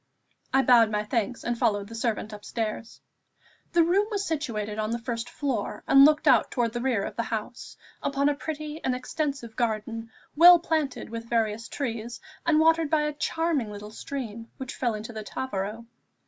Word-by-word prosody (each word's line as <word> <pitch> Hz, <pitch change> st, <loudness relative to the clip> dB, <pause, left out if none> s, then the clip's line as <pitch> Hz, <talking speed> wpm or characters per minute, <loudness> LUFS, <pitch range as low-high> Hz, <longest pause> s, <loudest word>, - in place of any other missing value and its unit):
I 270 Hz, 0 st, +4 dB
bowed 235 Hz, -4 st, +6 dB
my 210 Hz, -1 st, -1 dB
thanks, 230 Hz, +1 st, -2 dB
and 240 Hz, -, -1 dB
followed 205 Hz, -4 st, +1 dB
the 230 Hz, -, -11 dB
servant 225 Hz, -2 st, -2 dB
upstairs. 220 Hz, +2 st, -5 dB, 0.7 s
The 340 Hz, -1 st, +5 dB
room 385 Hz, +5 st, +2 dB
was 405 Hz, -2 st, -2 dB
situated 220 Hz, -9 st, -3 dB
on 215 Hz, 0 st, -1 dB
the 235 Hz, -, -1 dB
first 230 Hz, 0 st, -4 dB
floor, 260 Hz, -8 st, -3 dB
and 275 Hz, 0 st, +8 dB
looked 305 Hz, +1 st, +3 dB
out 255 Hz, -5 st, +5 dB
towards 235 Hz, -2 st, -1 dB
the 240 Hz, -, -3 dB
rear 240 Hz, -6 st, +1 dB
of -, -, -5 dB
the -, -, 0 dB
house, 230 Hz, +1 st, -5 dB, 0.2 s
upon 280 Hz, 0 st, +1 dB
a 290 Hz, -, +3 dB
pretty 305 Hz, +1 st, -6 dB
and 255 Hz, -, +1 dB
extensive 275 Hz, -3 st, -3 dB
garden, 225 Hz, 0 st, -2 dB, 0.3 s
well 350 Hz, +3 st, +10 dB
planted 315 Hz, -8 st, -2 dB
with 230 Hz, 0 st, -6 dB
various 225 Hz, -1 st, 0 dB
trees, 235 Hz, -3 st, -4 dB, 0.3 s
and 310 Hz, -2 st, +5 dB
watered 325 Hz, -1 st, +4 dB
by 310 Hz, 0 st, +3 dB
a 300 Hz, 0 st, -1 dB
charming 305 Hz, -5 st, -1 dB
little 210 Hz, +1 st, -8 dB
stream, 230 Hz, -2 st, -6 dB
which 265 Hz, -1 st, -6 dB
fell 240 Hz, -4 st, 0 dB
into 215 Hz, +3 st, -7 dB
the 220 Hz, -1 st, -5 dB
Tavaro. 215 Hz, -1 st, -4 dB
240 Hz, 180 wpm, -27 LUFS, 220-290 Hz, 0.7 s, well